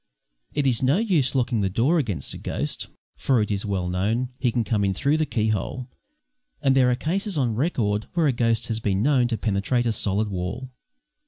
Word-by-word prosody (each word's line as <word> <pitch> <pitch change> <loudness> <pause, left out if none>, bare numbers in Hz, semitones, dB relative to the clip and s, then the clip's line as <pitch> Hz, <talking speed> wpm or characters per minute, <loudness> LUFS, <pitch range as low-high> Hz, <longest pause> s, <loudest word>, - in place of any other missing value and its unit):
It 145 - -1
is 125 -4 +2
no 135 +5 +3
use 170 - +1
locking 120 -3 +1
the 95 - +1
door 130 - +2
against 100 - -2
a - - -8
ghost, - - -3 0.3
for, 130 -3 +2
as 105 -1 0
is 100 +1 -2
well 95 -3 -1
known, 105 +8 0
he 125 - +1
can 120 0 0
come 105 -2 0
in 95 -1 0
through 140 +8 +1
the 155 -1 0
key 110 -3 0
hole, 125 +4 -3 0.7
and 135 -2 +2
there 130 -2 +5
are 125 - +2
cases 190 - -2
on 125 -5 +1
record 110 -6 0
when 170 -2 +3
a 145 - +4
ghost 115 -2 +1
has 115 -2 -2
been 100 -2 0
known 130 -3 +3
to 115 -2 -2
penetrate 110 +4 0
a 115 - +2
solid 105 0 0
wall. 100 +8 -4
120 Hz, 215 wpm, -24 LUFS, 105-135 Hz, 0.7 s, there